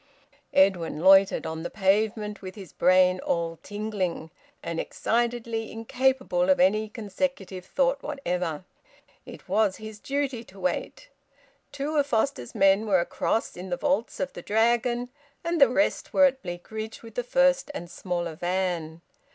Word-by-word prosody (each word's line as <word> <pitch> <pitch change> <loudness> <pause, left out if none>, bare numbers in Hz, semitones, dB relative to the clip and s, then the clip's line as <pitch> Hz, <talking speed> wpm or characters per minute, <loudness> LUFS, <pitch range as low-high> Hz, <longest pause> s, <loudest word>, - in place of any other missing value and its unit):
Edwin 190 -5 +3
loitered 195 +1 +6
on 160 0 -4
the 175 - -4
pavement, 210 +1 0
with 185 -1 -8
his 195 -6 -11
brain 185 0 +4
all 165 -2 -2
tingling, 205 -6 -3 0.3
and 170 -1 -3
excitedly 235 -1 -1
incapable 265 +3 0
of 280 -1 +4
any 220 -6 +3
consecutive 205 -3 -4
thought 270 +5 +1
whatever. 180 - -3 0.6
It - - -11
was 210 -3 +2
his 215 -1 -9
duty 275 -2 -2
to 195 -2 -15
wait. 190 - -3 0.6
Two 285 +2 -3
of 285 -1 +2
Foster's 240 0 -1
men 195 +1 +4
were 190 -3 +4
across 200 +5 -1
in 185 +1 -7
the 175 - -1
vaults 280 -5 -1
of 185 -1 -2
the - - -8
Dragon; 240 +4 +1 0.3
the 335 -6 +4
rest 295 +4 0
were 285 - +7
at 265 -1 +1
Bleakridge 215 +6 -7
with 225 -1 -11
the 245 - -2
first 270 +3 +2
and 175 - -5
smaller 175 -1 -4
van. 175 -2 -2
215 Hz, 145 wpm, -26 LUFS, 185-255 Hz, 0.6 s, were